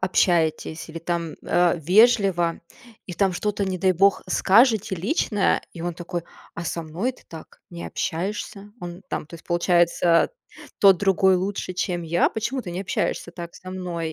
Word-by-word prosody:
общаетесь 170 -3 +1
или 165 +1 -7
там, 170 -1 -3
э, 175 +1 +3
вежливо 190 -2 +3 0.5
и 180 - -6
там 190 +1 +1
что-то, 205 +2 -1
не 190 -1 -3
дай 185 +2 +3
бог, 195 +2 +3
скажете 220 -1 +4
личное, 205 - +1
и 170 - -10
он 175 -1 -3
такой: 175 0 -5 0.3
"А 170 - -6
со 170 0 -3
мной 180 +11 -2
ты 255 - -18
так 160 -1 -12
не 170 0 -7
общаешься. 195 +3 -4
Он 175 +1 -8
там - - -4
то 170 - -12
есть 165 - -12
получается 175 -1 +3 0.5
тот 195 -3 +6
другой 190 -1 +3
лучше, 185 0 -2
чем 180 -1 -2
я? 170 +1 +2
Почему 235 +4 -3
ты 175 - -7
не 180 +3 -4
общаешься 175 -2 -2
так 170 -1 -8
со 185 - -12
мной?" 170 -3 -4
180 Hz, 170 wpm, -23 LUFS, 170-195 Hz, 0.5 s, тот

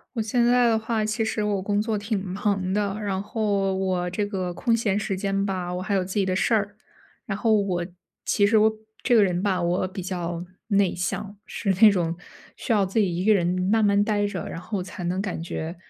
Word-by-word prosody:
我 225 - 0
现 235 +3 +1
在 245 0 +4
的 225 -1 +3
话， 220 -1 -1
其 220 +1 -1
实 220 -1 -1
我 205 -2 0
工 205 +1 0
作 220 0 -1
挺 205 0 -2
忙 190 0 -1
的， 200 -1 0
然 195 -3 -2
后 200 -2 0
我 185 -2 -1
这 205 +4 -1
个 190 -3 -3
空 230 +6 +1
闲 215 -4 0
时 200 -1 -2
间 195 +1 -1
吧， 185 -3 -3
我 180 - -3
还 190 +2 -2
有 190 -2 +2
自 185 +1 -6
己 200 -2 +2
的 185 -1 0
事 225 +4 +2
儿。 205 -1 -1 0.5
然 200 -1 -2
后 225 +1 +2
我 180 -3 -1 0.4
其 205 - +3
实 220 +2 +4
我 215 +1 +5 0.3
这 245 - +3
个 220 - +7
人 180 -1 0
吧， 190 -3 +1
我 175 +2 0
比 190 +1 -6
较 175 -2 -4 0.3
内 200 -3 +2
向， 195 +3 -3
是 200 - -2
那 220 -2 +9
种 170 -3 -1 0.4
需 - - -1
要 205 -2 +3
自 195 +4 0
己 190 -5 +1
一 180 +2 -2
个 215 - +6
人 185 -4 +2 0.3
慢 220 -1 +4
慢 200 0 +4
待 205 -1 +1
着， 195 -4 -4
然 - - -6
后 190 +2 -4
才 185 0 -7
能 180 +2 -1
感 195 -5 -3
觉 165 0 -5
200 Hz, 250 characters per minute, -25 LUFS, 185-215 Hz, 0.5 s, 那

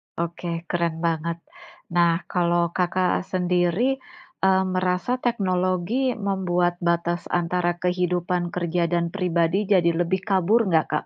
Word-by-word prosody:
Oke 170 +1 -4 0.2
keren 170 -1 -1
banget. 165 +1 -2 0.5
Nah 170 -1 +4 0.2
kalau 175 -1 +2
Kakak 180 0 0
sendiri, 180 +5 +1 0.6
eee, 190 0 +4
merasa 185 +7 0
teknologi 200 +2 0
membuat 180 -4 0
batas 170 0 -1
antara 175 0 0
kehidupan 180 0 0
kerja 175 0 0
dan 170 -1 0
pribadi 180 -1 +1
jadi 170 -2 +4
lebih 185 +2 0
kabur 195 +4 +3
enggak, 160 -4 +2
Kak? 150 - -1
180 Hz, 120 wpm, -24 LUFS, 170-185 Hz, 0.6 s, Nah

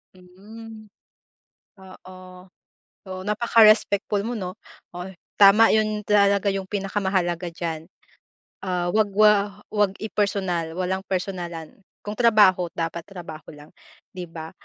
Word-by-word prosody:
Hmm, 215 +5 -13 0.9
oo. 185 -1 -14 0.6
So 190 - -15 0.2
napaka-respectful 215 -2 +3
mo 230 - -4
no, 185 -1 -6 0.4
oh, 180 +1 -6 0.3
tama 210 +3 +6
yon 215 -1 0
talaga 200 -1 +3
yung 195 -1 -1
pinakamahalaga 190 -4 -2
diyan, 165 -2 -5 0.8
ah, 180 -1 -1
wag 215 +1 +1
wa 210 -1 +3
wag 205 -2 +1
i-personal, 190 -6 -2
walang 185 +2 -3
personalan 175 -4 -5 0.2
kung 210 0 -7
trabaho 210 -6 +4
dapat 165 0 -3
trabaho 170 -5 -10
lang, 150 0 -15 0.4
diba? 165 -3 -8
190 Hz, 105 wpm, -23 LUFS, 180-210 Hz, 0.9 s, tama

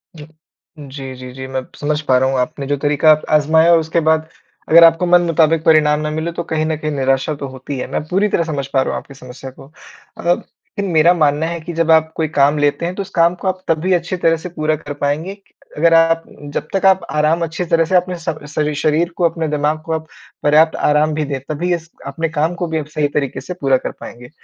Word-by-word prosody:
जी। 150 -2 -11 0.5
जी, 135 -2 -8
जी, 125 0 -10
जी, 130 0 -7
मैं 130 0 -3 0.2
समझ 150 0 -1
पा 130 -4 +2
रहा 130 +1 +2
हूँ, 135 - -1
आपने 140 +2 -3
जो 145 - 0
तरीका 150 +2 +3 0.2
आज़माया, 160 +3 +4
उसके 165 +1 0
बाद 160 0 +1 0.4
अगर 170 +1 +8
आपको 165 +2 +5
मन 175 0 +5
मुताबिक 165 -1 +2
परिणाम 150 -2 +4
ना 150 - -2
मिले, 160 +2 -3
तो 170 +1 -4
कहीं 155 -1 -2
न 160 - -1
कहीं 155 0 -3
निराशा 135 +1 0
तो 140 -1 -6
होती 130 +1 -7
है। - - -4
मैं - - -2
पूरी 195 +5 +1
तरह 170 - +1
समझ 145 -4 -4
पा 135 -1 +1
रहा - - -1
हूँ - - -2
आपकी 140 - -15
समस्या 130 0 -10
को। 135 +2 -16 0.5
अगर 175 +1 +1
लेकिन 200 0 -8
मेरा 160 +3 +5
मानना 155 -2 +1
है 170 +1 -4
कि 170 +2 -7
जब 165 0 +1
आप 160 0 +4
कोई 160 - -1
काम 145 -1 +2
लेते 145 +3 0
हैं, 175 +1 -3
तो 200 - -3
उस 195 - -7
काम 170 -2 +2
को 185 - -6
आप 185 0 -2
तभी 165 +3 +1
अच्छी 175 +1 -1
तरह 165 -1 +2
से 180 +3 -8
पूरा 155 -2 -1
कर 145 -1 -8
पाएँगे, 150 +7 -3 0.4
अगर 165 +2 +4
आप 165 0 +4 0.3
जब 150 - -3
तक 195 0 0
आप 190 -1 +5
आराम 155 +3 +1
अच्छी 165 +2 -3
तरह 165 0 +2
से 185 - -1
अपने 180 0 +1
स 165 -1 -3 0.2
सरी 150 0 0
शरीर 155 +3 +1
को, 180 - -1
अपने 160 -1 -4
दिमाग 150 +1 -1
को 165 - -5
आप 160 0 -4 0.4
पर्याप्त 155 +2 +4
आराम 150 +1 +2
भी 155 0 -1
दें, 140 -1 -4
तभी 175 +4 -1
इस 170 0 -10 0.2
अपने 160 +4 -3
काम 160 +2 -1
को 175 0 -3
भी 160 - -2
आप 150 - -5
सही 150 -1 -1
तरीके 145 -2 -3
से 180 - -6
पूरा 135 -6 +1
कर - - -5
पाएँगे। 120 +1 -11
155 Hz, 245 wpm, -17 LUFS, 145-170 Hz, 0.5 s, अगर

